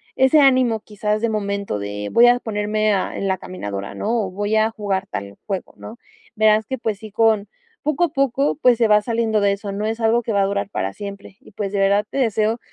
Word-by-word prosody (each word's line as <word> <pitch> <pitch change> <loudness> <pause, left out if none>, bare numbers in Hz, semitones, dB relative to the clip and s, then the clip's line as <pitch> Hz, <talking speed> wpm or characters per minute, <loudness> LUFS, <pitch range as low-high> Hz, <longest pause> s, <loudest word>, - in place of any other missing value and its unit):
ese 265 +4 +5
ánimo, 255 -5 +3
quizás 210 0 -2
de 230 - +1
momento 200 - -2
de 100 0 -5
voy 240 +1 +6
a 245 0 +4
ponerme 215 0 0
a 190 - -2
en 195 - -2
la 190 - +1
caminadora, 100 - -6
¿no?, 225 0 -1
o 185 - -6
voy 205 +3 -1
a 220 +1 +3
jugar 200 -3 -2
tal 100 0 -6
juego, 195 -3 -5
¿no? 230 - -10 0.4
Verás 215 0 +3
que, 265 - -3
pues 220 -4 -2
sí, 215 -1 -9
con 215 -1 +2 0.4
poco 305 +3 0
a 340 - -4
poco, 275 -1 0
pues, 250 -5 +3
se 225 -2 +2
va 210 0 +5
saliendo 225 -1 0
de 200 -1 +2
eso. 200 0 -6
No 205 +2 -3
es 225 +1 -3
algo 230 +2 +3
que 225 -2 -3
va 200 - +2
a 195 - +3
durar 200 0 -2
para 95 +1 -2
siempre 200 -1 -9
y - - -18
pues, 200 -1 -4
de 200 - -1
verdad 200 +1 +3
te - - -6
deseo, 225 -2 +1
215 Hz, 235 wpm, -21 LUFS, 200-230 Hz, 0.4 s, voy